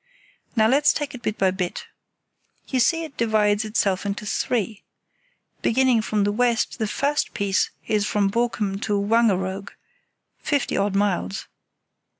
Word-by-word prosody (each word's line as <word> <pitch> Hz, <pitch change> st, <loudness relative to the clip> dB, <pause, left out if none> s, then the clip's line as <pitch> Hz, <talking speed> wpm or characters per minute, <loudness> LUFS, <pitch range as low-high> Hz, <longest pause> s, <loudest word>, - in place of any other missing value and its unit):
Now 220 Hz, -2 st, +4 dB
let's 285 Hz, +4 st, +4 dB
take 295 Hz, -1 st, -3 dB
it 255 Hz, -, -9 dB
bit 215 Hz, -2 st, -2 dB
by 190 Hz, -1 st, +3 dB
bit. 185 Hz, -1 st, -4 dB, 0.8 s
You 260 Hz, -, 0 dB
see 330 Hz, +7 st, +2 dB
it 310 Hz, -3 st, -9 dB
divides 215 Hz, -2 st, +2 dB
itself 210 Hz, -3 st, 0 dB
into 205 Hz, +1 st, -4 dB
three. 215 Hz, -1 st, -1 dB, 0.8 s
Beginning 250 Hz, -1 st, +3 dB
from 215 Hz, -1 st, 0 dB
the 205 Hz, -, +1 dB
west 235 Hz, +1 st, 0 dB
the 220 Hz, -, 0 dB
first 285 Hz, +7 st, -1 dB
piece 200 Hz, -1 st, +1 dB, 0.2 s
is 210 Hz, -1 st, +1 dB
from 200 Hz, -2 st, +1 dB
Borkum 210 Hz, -4 st, -1 dB
to 210 Hz, -2 st, 0 dB
Wangeroog—fifty 200 Hz, +6 st, -2 dB
odd 200 Hz, 0 st, 0 dB
miles. 190 Hz, -, -1 dB
215 Hz, 140 wpm, -23 LUFS, 200-240 Hz, 0.8 s, Now